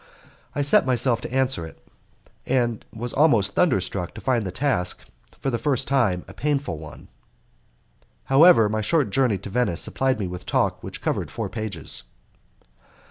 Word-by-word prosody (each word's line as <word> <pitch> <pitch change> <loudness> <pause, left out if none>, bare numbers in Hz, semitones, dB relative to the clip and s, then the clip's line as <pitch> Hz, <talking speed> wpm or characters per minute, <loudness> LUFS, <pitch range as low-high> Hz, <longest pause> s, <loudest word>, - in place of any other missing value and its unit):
I 145 - 0
set 140 - +6
myself 125 -2 +3
to - - -7
answer 130 -7 +1
it, 80 - -11 0.7
and 120 -3 0
was 115 +2 -4
almost 115 -10 +3
thunderstruck 95 - 0
to - - -8
find 120 -6 0
the - - -4
task, 90 -5 -1 0.3
for 135 - -2
the 115 - -2
first 140 -5 0
time, 115 -10 +1
a 95 - -11
painful 140 - -2
one. 80 -1 -11 1.2
However, 135 -4 +6
my 110 +1 -2
short 140 0 +1
journey 125 -5 +2
to 100 +2 -9
Venice 120 -8 0
supplied 130 -2 -1
me 100 - -2
with 90 0 -7
talk - - 0
which - - -8
covered - - -2
four - - -5
pages. 110 - -3
120 Hz, 160 wpm, -23 LUFS, 95-135 Hz, 1.2 s, set